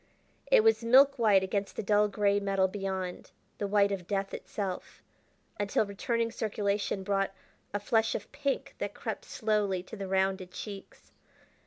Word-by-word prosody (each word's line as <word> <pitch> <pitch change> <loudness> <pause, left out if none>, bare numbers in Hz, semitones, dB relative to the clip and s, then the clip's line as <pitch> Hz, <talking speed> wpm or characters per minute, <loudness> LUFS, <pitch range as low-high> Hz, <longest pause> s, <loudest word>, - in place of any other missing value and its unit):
It - - +6
was 445 - +4
milk 270 +3 +6
white 205 -4 +5
against 195 +1 -2
the - - -3
dull 210 +1 +4
gray 205 0 +2
metal 195 -1 +2
beyond, 190 -2 -4 0.3
the 205 - -1
white 200 0 +3
of 185 -3 -4
death 195 -1 -2
itself, 195 -3 -5 0.6
until 205 +1 +1
returning 230 +3 -1
circulation 205 -3 -1
brought 195 0 0 0.4
a 205 - -1
flush 225 +2 +1
of 205 - -6
pink 275 0 -2
that - - -3
crept - - -5
slowly 210 -5 0
to 190 - -9
the 200 -2 -5
rounded 190 -1 0
cheeks. 195 +1 -9
200 Hz, 155 wpm, -30 LUFS, 195-220 Hz, 0.6 s, It